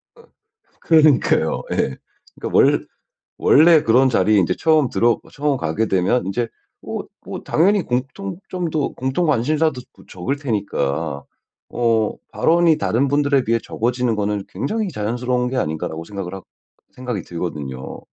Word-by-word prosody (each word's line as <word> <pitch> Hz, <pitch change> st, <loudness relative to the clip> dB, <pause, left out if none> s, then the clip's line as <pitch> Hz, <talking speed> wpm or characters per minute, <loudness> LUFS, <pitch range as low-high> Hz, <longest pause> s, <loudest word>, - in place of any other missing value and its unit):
아 465 Hz, -, -18 dB, 0.6 s
그러니까요. 155 Hz, -6 st, +3 dB
예. 65 Hz, -, 0 dB, 0.4 s
그러니까 -, -, -4 dB
원 -, -, +4 dB, 0.5 s
원래 160 Hz, +1 st, +6 dB
그런 125 Hz, +4 st, +4 dB
자리에 105 Hz, -2 st, +3 dB
인제 90 Hz, -, +1 dB
처음 155 Hz, -6 st, +3 dB
들어 120 Hz, 0 st, +2 dB
처음 145 Hz, -1 st, 0 dB
가게 90 Hz, +4 st, -1 dB
되면 95 Hz, +6 st, +1 dB
인제 115 Hz, +5 st, -1 dB, 0.4 s
어 -, -, -3 dB, 0.3 s
뭐 -, -, -6 dB
당연히 195 Hz, +5 st, +3 dB
공통점도 165 Hz, +4 st, -3 dB
공통 130 Hz, +7 st, -1 dB
관심사도 150 Hz, 0 st, +1 dB, 0.2 s
뭐 -, -, -17 dB
적을 120 Hz, +10 st, -3 dB
테니까 80 Hz, -, -2 dB, 0.5 s
어 115 Hz, -3 st, +1 dB, 0.2 s
'발언이 170 Hz, -1 st, +3 dB
다른 140 Hz, -2 st, +1 dB
분들에 140 Hz, -1 st, +2 dB
비해 115 Hz, 0 st, +1 dB
적어지는 120 Hz, 0 st, -1 dB
거는 105 Hz, -1 st, -2 dB
굉장히 215 Hz, +9 st, -2 dB
자연스러운 125 Hz, 0 st, -1 dB
게 130 Hz, -, -3 dB
아닌가.'라고 80 Hz, -3 st, -3 dB
생각을 95 Hz, -1 st, -6 dB
하 95 Hz, -, -8 dB, 0.5 s
생각이 125 Hz, -6 st, -4 dB
들거든요. 75 Hz, -7 st, -6 dB
125 Hz, 320 characters per minute, -20 LUFS, 100-150 Hz, 0.6 s, 원래